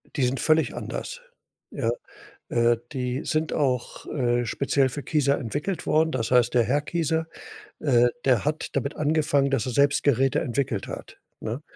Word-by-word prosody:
Die 135 - +1
sind 125 +1 +1
völlig 155 +4 +2
anders, - - -5 0.5
ja. - - -1 0.6
Äh, 120 0 +3 0.2
die 125 0 -2
sind 155 0 0
auch, 130 -4 -1
äh, 120 -2 0
speziell 135 +2 +1
für 145 +2 -6
Kieser 140 -2 +2
entwickelt 145 - -3
worden. 160 +1 +3
Das 115 -3 -2
heißt, 125 -2 +4
der 120 - +4
Herr 135 +6 +1
Kieser, 160 +1 -1 0.5
äh, 125 -5 +4 0.2
der 125 -6 +3
hat 150 +2 -2
damit 140 +2 -1
angefangen, 145 -2 +2
dass 135 -4 0
er 125 - -2
selbst 140 +2 +3
Geräte 135 -2 +3
entwickelt 125 -4 -2
hat, - - -8 0.2
ne? 115 +7 -4
135 Hz, 165 wpm, -25 LUFS, 125-150 Hz, 0.6 s, heißt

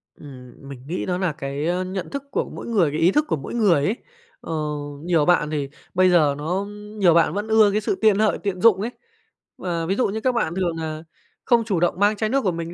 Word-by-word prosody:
Ừm, 130 -4 -12 0.2
mình 135 -3 -9
nghĩ 175 +4 -3
đó 180 -1 -1
nà 185 -3 0
cái, 140 +2 -4
ơ, 180 +1 0
nhận 185 0 -5
thức 280 -1 -5
của - - -1
mỗi - - -8
người, 195 -10 +2
cái 155 - -3
ý 170 +3 +4
thức 300 +8 +2
của - - 0
mỗi 140 - -7
người 195 -11 +3
ấy. 215 - 0 0.5
Ờ, 165 - -6 0.5
nhiều 170 -4 +2
bạn 165 -3 +3
thì 145 -3 -3 0.2
bây 185 0 +4
giờ 155 -5 +4
nó, 150 +1 -6
ưm, 210 +1 -8
nhiều 180 -4 +5
bạn 165 -2 +3
vẫn 205 +3 -3
ưa 220 -2 +5
cái 215 - 0
sự 205 - -1
tiện 215 -2 +4
lợi, 215 -1 +2
tiện 190 -3 -3
dụng 205 -4 +5
ấy. 230 +3 -3 0.7
Và 170 -3 -3
ví 190 - 0
dụ 255 - +1
như 220 +3 -4
các 255 - +2
bạn 170 -7 -1
thường 180 -3 -1
nà 155 0 -5 0.4
không 235 -2 +3
chủ 195 -6 0
động 175 +1 0
mang 205 +1 +3
chai 215 +1 -1
nước 275 +4 +1
của 185 - +1
mình 170 0 -5
185 Hz, 255 wpm, -22 LUFS, 160-210 Hz, 0.7 s, nhiều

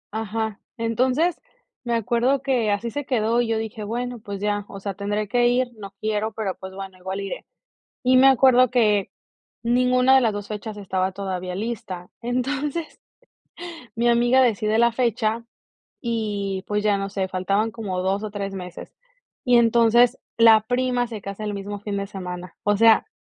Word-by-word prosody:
Ajá, 220 -1 -3 0.2
entonces, 255 +9 +1 0.4
me 235 -1 -1
acuerdo 240 +4 +1
que 250 -5 +1
así 205 +3 -1
se 290 +5 -3
quedó 235 -2 +1
y 240 - -1
yo 225 0 0
dije: 220 -1 -5
"Bueno, 245 +3 -4
pues 200 -2 -7
ya, 205 0 -1
o 195 - -8
sea, 195 0 -4
tendré 205 +2 -2
que 240 +2 +3
ir, 250 +1 +2
no 200 -2 -8
quiero, 215 0 -1
pero, 210 -4 -3
pues 190 0 -8
bueno, 190 -1 -8
igual 190 +2 -4
iré". 195 - -6 0.6
Y 255 0 +3
me 265 +1 +7
acuerdo 255 -1 +5
que 210 -5 +2 0.5
ninguna 250 +2 +3
de 265 - +6
las 225 -3 +2
2 205 0 -6
fechas 210 0 -6
estaba 190 -1 -1
todavía 185 -2 -4
lista. 195 -5 -5
Entonces, 270 +6 -3 0.9
mi 235 +1 +1
amiga 240 +2 +4
decide 215 -3 +1
la 235 0 +5
fecha 230 -1 0 0.6
y 205 -5 -2
pues 210 0 -1
ya, 205 -1 +3
no 195 0 -3
sé, 190 -1 -2
faltaban 195 +4 0
como 200 -5 -4
2 195 +2 0
o 215 - -3
3 200 -1 -5
meses. 180 -2 -8 0.5
Y 245 -2 +5
entonces 235 +1 +4 0.2
la 225 -1 +7
prima 245 +2 0
se 220 -4 -7
casa 200 +2 -6
el 210 -1 -3
mismo 205 +1 -5
fin 205 0 -4
de 200 - -2
semana, 180 -2 -7
o 205 0 +2
sea, 225 - +5
220 Hz, 175 wpm, -23 LUFS, 200-240 Hz, 0.9 s, me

